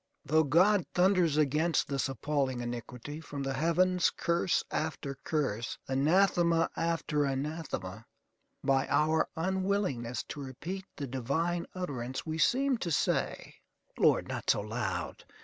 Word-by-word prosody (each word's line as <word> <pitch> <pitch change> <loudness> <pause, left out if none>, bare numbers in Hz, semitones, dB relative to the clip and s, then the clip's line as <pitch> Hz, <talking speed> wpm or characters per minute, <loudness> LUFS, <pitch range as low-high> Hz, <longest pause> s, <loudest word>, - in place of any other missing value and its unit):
Though 155 +2 +3
God 180 +6 +4
thunders 180 -4 +3
against 155 +2 +2
this 135 -1 -1
appalling 135 -2 -1
iniquity 120 +4 -6
from 145 -3 -6
the 135 0 -2
heavens 175 +5 +3
curse 170 +1 +1
after 150 -3 -2
curse, 120 -8 -1
anathema 165 +4 +3
after 165 -3 0
anathema, 135 - -4 0.6
by 135 -1 +2
our 155 +1 +2
unwillingness 185 - -1
to 145 - -6
repeat 170 +9 -6
the 145 - -4
divine 140 +7 -1
utterance 130 -8 -4
we 160 0 -3
seem 265 - +3
to 175 - -2
say, 155 - -1 0.4
"Lord, - - +4
not - - -4
so - - +4
loud! 110 +3 -3
150 Hz, 125 wpm, -31 LUFS, 135-170 Hz, 0.6 s, God